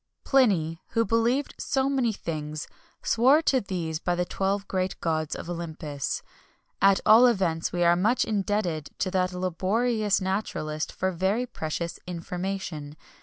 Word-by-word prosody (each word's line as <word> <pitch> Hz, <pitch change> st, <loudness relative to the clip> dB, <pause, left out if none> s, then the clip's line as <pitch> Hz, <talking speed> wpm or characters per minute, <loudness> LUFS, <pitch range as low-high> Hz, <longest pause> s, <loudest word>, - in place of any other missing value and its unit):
Pliny, 180 Hz, -, +2 dB
who 230 Hz, -1 st, +2 dB
believed 230 Hz, +6 st, +1 dB
so 265 Hz, 0 st, 0 dB
many 265 Hz, -4 st, +1 dB
things, 155 Hz, -5 st, -5 dB, 0.4 s
swore 260 Hz, +6 st, +5 dB
to 265 Hz, -4 st, +3 dB
these 170 Hz, -5 st, -3 dB
by 175 Hz, +1 st, 0 dB
the 180 Hz, 0 st, 0 dB
twelve 195 Hz, +2 st, -1 dB
great 185 Hz, -1 st, -2 dB
gods 155 Hz, -2 st, -1 dB
of -, -, -7 dB
Olympus. 160 Hz, -4 st, -4 dB, 0.6 s
At 195 Hz, 0 st, +5 dB
all 230 Hz, +4 st, +8 dB
events, 180 Hz, -8 st, +1 dB
we 175 Hz, 0 st, 0 dB
are 170 Hz, 0 st, +5 dB
much 215 Hz, +8 st, +2 dB
indebted 195 Hz, -7 st, -1 dB
to 185 Hz, -, -1 dB
that 185 Hz, -1 st, +1 dB
laborious 200 Hz, +5 st, 0 dB
naturalist 185 Hz, -6 st, -2 dB
for 190 Hz, 0 st, -1 dB
very 190 Hz, +7 st, 0 dB
precious 170 Hz, -5 st, -4 dB
information. 175 Hz, -3 st, -4 dB
185 Hz, 140 wpm, -27 LUFS, 165-215 Hz, 0.6 s, all